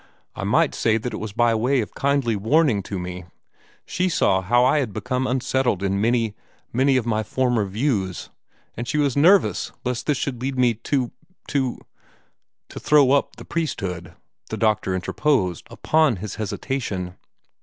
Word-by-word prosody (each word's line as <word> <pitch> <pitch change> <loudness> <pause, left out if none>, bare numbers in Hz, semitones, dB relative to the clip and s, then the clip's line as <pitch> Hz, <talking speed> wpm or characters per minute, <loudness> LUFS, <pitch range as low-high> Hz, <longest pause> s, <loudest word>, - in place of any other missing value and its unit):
I - - -5
might - - +2
say 110 0 +1
that 120 +2 -4
it - - -4
was 110 -1 -5
by 120 +2 +2
way 125 +5 +1
of 110 - -3
kindly 140 -5 +1
warning 115 +2 +2
to 100 +1 -5
me. 90 0 -6 0.6
She 185 +1 -1
saw 95 - +2
how 120 +6 +3
I 140 +4 +3
had 120 -8 -2
become 130 +3 -2
unsettled 125 -5 0
in 100 0 0
many 115 -1 +1 0.4
many 130 +2 +3
of 125 - -1
my 110 -2 0
former 120 0 0
views 100 -3 -2 0.4
and 120 +1 -5
she 150 - -1
was 145 -4 +1
nervous 180 +7 +4
lest 125 -1 -2
this 150 -3 +2
should 125 -2 -3
lead 130 0 -3
me 125 -2 +3
to 125 +3 -2 0.4
to 135 -3 0 0.5
" - - -48
"To - - -8
throw 145 -3 +4
up 140 0 +1
the - - -11
priesthood," 90 - -4 0.3
the - - -4
doctor 110 -4 +1
interposed 95 - 0
upon 155 -5 +2
his 100 +2 -6
hesitation. 100 -5 -3
120 Hz, 170 wpm, -23 LUFS, 100-135 Hz, 0.6 s, nervous